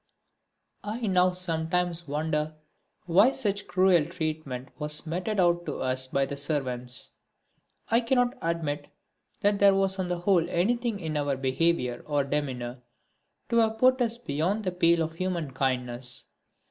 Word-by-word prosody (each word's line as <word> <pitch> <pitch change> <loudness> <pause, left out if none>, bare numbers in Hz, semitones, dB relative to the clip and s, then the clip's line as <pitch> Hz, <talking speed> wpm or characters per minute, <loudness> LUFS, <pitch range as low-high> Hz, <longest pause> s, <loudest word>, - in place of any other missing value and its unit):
I 215 +4 -4
now 185 -2 +3
sometimes 175 -1 0
wonder 150 +1 -1 0.5
why 190 +7 +5
such 200 -1 -1
cruel 180 -4 +4
treatment 155 -7 -4
was 150 +2 -3
meted 185 +6 -2
out 175 -1 +2
to - - -3
us 130 0 -1
by 135 +1 +1
the 140 - -5
servants. 125 -4 -2 0.8
I 230 - +4
cannot 245 +1 +1
admit 155 -3 -2 0.5
that 205 0 +2
there 200 -1 +6
was 195 0 +1
on 185 - -1
the 175 0 -1
whole 175 -3 +3
anything 230 +5 0
in 160 -4 -4
our 145 -2 0
behaviour 130 -1 0
or 145 -2 +1
demeanour 130 -4 -3 0.7
to 235 - +2
have 220 -1 +3
put 255 +2 +4
us 235 -1 0
beyond 185 +2 -1
the 185 - -1
pale 170 -1 +3
of 160 0 -4
human 170 -4 -2
kindness. 125 -2 -2
170 Hz, 145 wpm, -27 LUFS, 145-195 Hz, 0.8 s, there